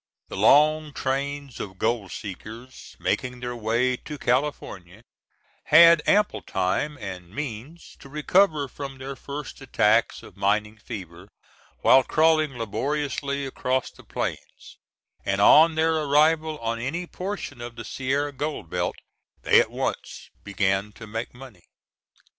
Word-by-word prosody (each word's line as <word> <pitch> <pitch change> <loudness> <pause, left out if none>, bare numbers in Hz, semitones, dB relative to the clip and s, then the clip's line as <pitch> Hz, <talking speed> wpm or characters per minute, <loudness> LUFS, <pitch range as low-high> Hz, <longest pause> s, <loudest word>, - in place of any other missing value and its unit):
The - - -6
long 155 +1 +4
trains 140 0 -3
of 95 -2 -7
gold 110 -3 -1
seekers 110 +5 -9
making 125 -1 -2
their 120 0 -5
way 120 +3 +1
to 150 +3 -8
California 120 -8 -2 0.6
had 170 +1 +8
ample 210 +1 +3
time 95 +11 -1
and 95 -6 -8
means 140 - -7
to 140 - -13
recover 150 0 +2
from 135 +1 -8
their 135 +1 -7
first 140 +2 -8
attacks 115 -3 +2
of - - -14
mining 105 +2 0
fever 95 -5 -9 0.5
while 135 - +6
crawling 155 -2 +2
laboriously 140 +5 -2
across 130 -1 -2
the - - -17
plains, - - -6 0.4
and 100 0 -1
on 155 +10 +7
their 160 +1 +2
arrival 155 +1 +2
on 115 0 -2
any 155 +9 -3
portion 180 -9 -6
of 120 0 -7
the 115 -1 -8
Sierra 140 +4 -1
gold 140 - -5
belt, - - -1 0.5
they - - +6
at - - -3
once - - -5
began 100 0 0
to 115 - -11
make 110 +2 -5
money. 125 -8 -13
130 Hz, 135 wpm, -25 LUFS, 110-150 Hz, 0.6 s, had